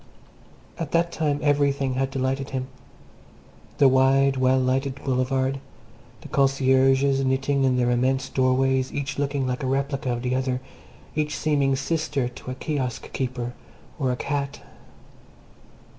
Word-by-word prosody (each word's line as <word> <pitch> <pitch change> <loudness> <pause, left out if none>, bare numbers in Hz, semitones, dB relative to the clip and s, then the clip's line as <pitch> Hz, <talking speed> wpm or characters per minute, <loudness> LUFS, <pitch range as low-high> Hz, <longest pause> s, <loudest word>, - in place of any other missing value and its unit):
At 165 -3 -4
that 170 0 +2
time 150 -3 0
everything 140 -2 +2
had 135 +1 0
delighted 135 0 -2
him 130 -1 -4 1.1
the 140 - +6
wide, 135 +1 +4
well 130 0 +3
lighted 130 +1 0
Boulevard, 130 +1 0 0.6
the - - -10
concierges 135 0 +3
knitting 135 +1 +1
in 130 -1 +2
their 125 -1 +2
immense 130 +2 +1
doorways, 130 0 +1
each 140 0 -4
looking 140 -1 0
like 125 +2 -2
a 130 - -2
replica 135 -1 -1
of 120 0 -3
the 125 0 0
other, 130 -1 0 0.6
each 150 0 -1
seeming 140 -3 +1
sister 140 -2 -1
to 125 +1 -9
a 130 - -4
kiosk 130 -3 -3
keeper 125 -2 -3 0.5
or 130 -3 +1
a - - 0
cat. 140 0 -3
135 Hz, 140 wpm, -24 LUFS, 130-140 Hz, 1.1 s, the